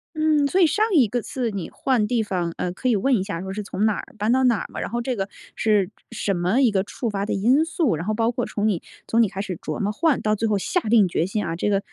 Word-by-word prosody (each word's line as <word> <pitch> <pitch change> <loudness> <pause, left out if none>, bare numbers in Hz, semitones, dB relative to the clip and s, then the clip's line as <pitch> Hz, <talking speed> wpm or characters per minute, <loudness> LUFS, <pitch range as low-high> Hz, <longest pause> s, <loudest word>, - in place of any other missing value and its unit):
嗯， 310 -2 +3
所 365 +7 +1
以 360 - +7
上 370 +8 +2
一 265 -7 +6
个 245 +4 -2
次 240 0 -3
你 195 -4 -5
换 250 -6 0
地 235 0 +1
方， 180 -5 -2
呃， 180 - -2
可 255 +8 -2
以 235 - +3
问 255 +6 +2
一 195 - 0
下 180 -4 -4
说 190 +1 -5
是 210 - -3
从 205 0 -2
哪 215 - +3
儿 - - -6
搬 215 +2 +1
到 260 +1 +3
哪 240 -3 +4
儿 - - -5
吗？ - - -5
然 - - -3
后 240 +1 -2
这 250 +1 -2
个 195 -2 -3 0.3
是 210 -3 +2 0.2
什 210 -3 -1
么 180 +7 +1
一 250 -4 +4
个 190 -2 +1
触 230 +3 -4
发 200 -1 -2
的 - - -2
因 245 +10 +3
素， 325 - 0
然 165 +4 -5
后 215 - 0
包 230 +2 +1
括 245 0 -2
从 210 0 -1
你 195 -6 0 0.3
从 230 - +3
你 220 - +3
开 190 - -7
始 190 -3 -4
琢 155 -1 -5
磨 205 +1 0
换， 300 +5 +1
到 215 0 +1
最 225 +2 -1
后 210 -2 +1
下 280 - 0
定 215 -3 +4
决 170 -1 0
心 210 +1 -2
啊， 165 -1 -3
这 195 - -1
个， 200 -1 +1
215 Hz, 320 characters per minute, -23 LUFS, 195-245 Hz, 0.3 s, 以